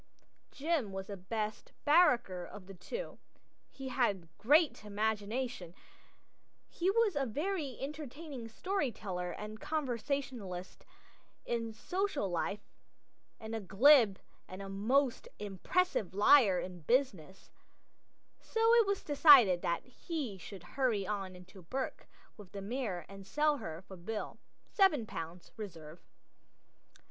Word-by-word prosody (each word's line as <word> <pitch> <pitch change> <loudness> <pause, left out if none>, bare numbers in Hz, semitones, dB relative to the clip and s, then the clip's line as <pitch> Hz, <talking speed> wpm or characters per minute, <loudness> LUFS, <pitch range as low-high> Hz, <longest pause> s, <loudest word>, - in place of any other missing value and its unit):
Jim 290 -7 -1
was 190 0 -5
the 200 - -6
best 210 +3 -4
"barracker" 245 - +4
of 185 +2 -10
the 195 - -10
two; 475 - -6 0.5
he 270 -1 -7
had 195 -11 -1
great 300 +1 +4
imagination; 210 -1 -2 0.9
he 355 +2 -1
was 430 -3 +3
a 280 - +1
very 295 - -2
entertaining 285 -2 -6
story 300 - -1
teller 180 -5 -4
and 210 +3 -7
conversationalist 250 - -3 0.6
in 230 -1 -2
social 305 - -2
life, 195 +4 -2 0.8
and 220 -1 -7
a 225 - -1
glib 215 - +6 0.3
and 185 - -8
a 195 0 -6
most 240 +7 +1
impressive 205 - -1
liar 205 -3 +6
in 180 -1 -6
business, 195 - -1 0.9
so 455 +1 +2
it 465 -3 +6
was 400 -1 -1
decided 275 - +7
that 170 - -1
he 255 - -5
should 190 -1 -10
hurry 225 -1 0
on 195 -2 -3
into 180 +1 -13
Bourke 260 +10 -4 0.3
with 205 -3 -13
the 200 - -5
mare 210 -5 -3
and 195 0 -11
sell 300 +4 +2
her 165 - -7
for 190 0 -11
Bill. 210 +5 -5 0.3
Seven 320 - +4
pounds, 170 -3 -7
reserve. 165 -6 -9
220 Hz, 125 wpm, -33 LUFS, 190-285 Hz, 0.9 s, decided